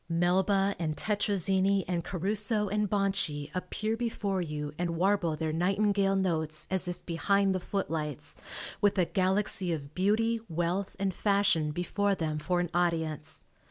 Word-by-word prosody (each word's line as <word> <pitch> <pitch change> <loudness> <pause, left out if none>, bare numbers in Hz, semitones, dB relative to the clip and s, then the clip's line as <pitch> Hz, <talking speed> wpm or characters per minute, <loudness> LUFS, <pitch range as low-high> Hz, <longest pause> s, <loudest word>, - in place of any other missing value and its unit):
Melba 190 +4 +2
and 155 -3 -2
Tettrazini 195 -2 +1
and 175 -2 -1
Caruso 210 +4 -1
and 210 0 0
Bonci 190 -8 -1
appear 215 +4 -2
before 210 -5 -1
you 150 -3 -4
and 170 -1 -1
warble 185 -3 +2
their 155 0 -2
nightingale 195 +3 +2
notes, 160 -5 0
as 190 -1 0
if 175 - -5
behind 195 +3 +2
the 185 - 0
footlights 150 -6 -3 0.5
with 205 0 +3
a 180 - +4
galaxy 190 0 +1
of 145 -3 -4
beauty, 220 +5 +2
wealth 175 +4 -1
and 195 -1 0
fashion 200 -6 +2
before 195 +5 0
them 155 -3 -2
for 175 +4 0
an 175 -1 -1
audience. 160 -3 -1
185 Hz, 145 wpm, -30 LUFS, 165-200 Hz, 0.5 s, a